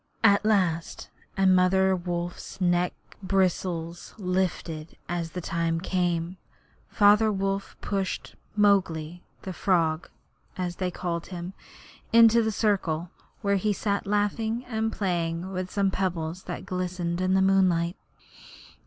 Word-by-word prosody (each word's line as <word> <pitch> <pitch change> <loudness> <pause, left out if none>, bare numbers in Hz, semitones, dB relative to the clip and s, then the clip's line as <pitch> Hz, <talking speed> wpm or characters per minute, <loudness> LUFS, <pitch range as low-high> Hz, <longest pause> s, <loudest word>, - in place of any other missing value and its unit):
At 200 -2 +5
last 185 -6 0 0.3
and 190 -1 +5
Mother 190 +1 +4
Wolfs 175 0 -5
neck 175 -1 +2 0.3
bristles 180 -3 -1
lifted 180 -4 -2
as 170 -2 -3
the 180 - -4
time 165 0 -1
came 175 -1 -1 0.5
Father 210 +1 +5
Wolf 195 0 -2
pushed 195 -2 -3 0.2
'Mowgli 180 -5 +2 0.2
the 190 - -5
Frog,' 170 -4 +1 0.5
as 180 -1 -3
they 185 -1 -1
called 170 -1 -4
him, 180 0 -6 0.6
into 230 0 +7
the 220 -1 0
centre, 180 -6 0 0.3
where 200 0 +2
he 210 +2 +1
sat 200 0 -2
laughing 220 +4 0
and 225 -2 -1
playing 175 -2 -2
with 185 -1 -3
some 200 -1 +1
pebbles 180 -2 -2
that - - -6
glistened 180 -1 -2
in 185 0 +2
the - - +4
moonlight. 185 -3 +3
185 Hz, 125 wpm, -27 LUFS, 175-200 Hz, 0.6 s, into